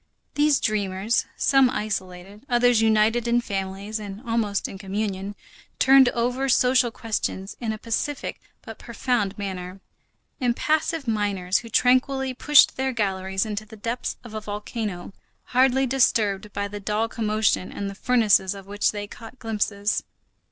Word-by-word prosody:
These 295 -1 +3
dreamers, 205 0 0
some 270 -2 +4
isolated, 200 -2 -5
others 240 -1 +4
united 220 +2 +3
in 235 0 +3
families 200 0 -4
and 200 -1 -7
almost 220 -3 0
in 195 - -9
communion, 200 0 -3 0.4
turned 265 -1 +6
over 250 +3 -1
social 250 0 +4
questions 215 -4 -4
in 230 -3 -2
a 220 - -4
pacific 235 +6 -3 0.2
but 225 - -10
profound 235 -4 -1
manner; 190 -2 -5 0.6
impassive 305 +4 0
miners, 200 -4 0
who 230 - -11
tranquilly 260 +3 +2
pushed 295 +3 +5
their 265 0 -1
galleries 190 -3 -1
into 215 0 -4
the 220 +1 -13
depths 230 +4 -3
of 235 -3 -11
a 215 - -4
volcano, 205 -3 -5 0.3
hardly 265 +1 +3
disturbed 215 -6 +1
by 200 0 -3
the 205 +1 -7
dull 210 +2 -1
commotion 215 -4 0
and 200 - -4
the 200 - -5
furnaces 210 -4 +2
of 195 -1 -10
which 205 +1 0
they 205 -1 -4
caught 225 +4 -12
glimpses. 210 -2 -1
215 Hz, 145 wpm, -24 LUFS, 200-245 Hz, 0.6 s, turned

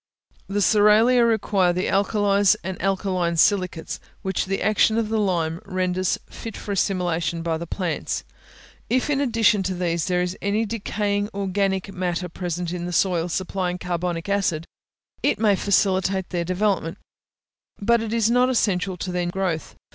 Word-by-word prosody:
The 205 +1 -1
cerealia 220 +4 +5
require 200 -5 +2
the 180 +1 -1
alkalies 200 0 +3
and 190 +1 -5
alkaline 185 -3 0
silicates, 185 -2 +1 0.2
which 190 -1 -1
the 195 +1 -2
action 215 +1 +3
of 225 -2 0
the 220 0 0
lime 170 -5 0
renders 185 0 -1
fit 225 - -8
for 205 - -6
assimilation 175 -4 0
by 165 -1 -1
the 170 - -6
plants. 175 -3 -3 0.7
If, 255 +4 +1
in 280 -1 +1
addition 225 -6 +3
to 190 0 -2
these, 170 -2 -1
there 180 -1 +1
is 180 +1 -3
any 205 +3 0
decaying 205 -2 -2
organic 195 -1 -1
matter 180 -1 -2
present 175 0 -4
in 175 -1 -4
the - - -4
soil 175 -1 +1
supplying 180 0 -2
carbonic 175 -1 -3
acid, 195 -5 0 0.6
it - - +2
may 210 -2 +3
facilitate 190 -1 +1
their 175 -2 -1
development; 185 -2 0 0.8
but 235 +3 +3
it 225 -1 -4
is 230 -1 +2
not 250 +1 +4
essential 195 -6 0
to 180 +2 -4
their 180 -1 -1
growth. 175 -3 -2
190 Hz, 155 wpm, -23 LUFS, 180-205 Hz, 0.8 s, cerealia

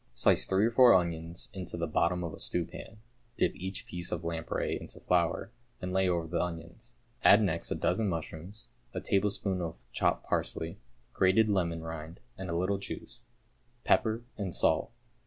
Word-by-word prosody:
Slice - - +3
three 95 +2 +3
or 115 - +2
four 125 0 +8
onions 85 -1 -1
into 95 -3 -5
the 85 - 0
bottom 85 +3 +1
of 85 -1 -4
a - - -9
stewpan, 90 +5 -4 0.4
dip - - +2
each 95 +1 -5
piece 90 0 -4
of 85 - -2
lamprey 85 -1 -2
into - - -8
flour, 90 +3 +1 0.3
and 90 0 -4
lay 95 -1 +3
over 85 -2 0
the 85 +1 -1
onions. 85 +7 -7 0.3
Add 105 +2 +8
next 85 -4 0
a - - -1
dozen 110 -3 +1
mushrooms, 85 +5 -6 0.3
a - - 0
tablespoonful 100 -1 +1
of 80 -2 -6
chopped - - +1
parsley, - - -2 0.3
grated 95 +4 +4
lemon 85 -5 0
rind 80 +1 -7 0.2
and 95 -1 -6
a 85 - 0
little 95 +3 +1
juice, 120 +4 -7 0.6
pepper, 110 +1 +2 0.2
and 95 -5 -2
salt. - - +2
90 Hz, 170 wpm, -31 LUFS, 85-100 Hz, 0.6 s, four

